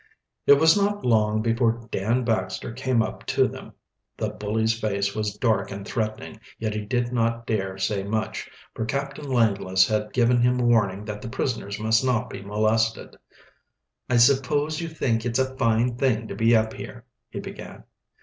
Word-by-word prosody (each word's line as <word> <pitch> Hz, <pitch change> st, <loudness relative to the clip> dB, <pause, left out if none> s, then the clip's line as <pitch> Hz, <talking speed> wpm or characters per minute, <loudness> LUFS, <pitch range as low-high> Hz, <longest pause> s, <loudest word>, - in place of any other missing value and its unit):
It -, -, +9 dB
was 160 Hz, +3 st, +5 dB
not 205 Hz, 0 st, 0 dB
long 110 Hz, -2 st, +2 dB
before 115 Hz, 0 st, 0 dB
Dan 115 Hz, +6 st, 0 dB
Baxter 110 Hz, -1 st, -2 dB
came 130 Hz, -2 st, +1 dB
up -, -, -6 dB
to -, -, +3 dB
them. -, -, -10 dB, 0.4 s
The -, -, -1 dB
bully's 110 Hz, +2 st, -1 dB
face 100 Hz, -2 st, -1 dB
was 105 Hz, -1 st, -3 dB
dark 110 Hz, -5 st, +1 dB
and 100 Hz, 0 st, -7 dB
threatening, 110 Hz, -1 st, -4 dB, 0.2 s
yet 110 Hz, -1 st, -2 dB
he 105 Hz, -, -2 dB
did 120 Hz, +3 st, -1 dB
not 115 Hz, -1 st, 0 dB
dare 95 Hz, -4 st, -2 dB
say 95 Hz, +1 st, -1 dB
much, 110 Hz, +2 st, -3 dB, 0.2 s
for -, -, -3 dB
Captain 140 Hz, +4 st, -4 dB
Langless 100 Hz, -6 st, +3 dB
had 105 Hz, -1 st, -1 dB
given 120 Hz, 0 st, +3 dB
him 125 Hz, +1 st, +3 dB
warning 110 Hz, -5 st, +2 dB
that 105 Hz, -1 st, -6 dB
the -, -, -6 dB
prisoners 115 Hz, -5 st, -3 dB
must 110 Hz, +2 st, +2 dB
not 125 Hz, -4 st, 0 dB
be 100 Hz, -, -7 dB
molested. 110 Hz, +2 st, 0 dB, 0.9 s
"I 120 Hz, -, +3 dB
suppose 145 Hz, +5 st, +3 dB
you 165 Hz, -, -3 dB
think 120 Hz, -8 st, -1 dB
it 120 Hz, 0 st, -1 dB
a 130 Hz, 0 st, 0 dB
fine 120 Hz, -1 st, +1 dB
thing 120 Hz, -4 st, +1 dB
to 100 Hz, -, -5 dB
be 115 Hz, +3 st, +4 dB
up 110 Hz, 0 st, +1 dB
here," 120 Hz, -1 st, -9 dB, 0.2 s
he -, -, -6 dB
began. -, -, -9 dB
115 Hz, 175 wpm, -24 LUFS, 105-125 Hz, 0.9 s, It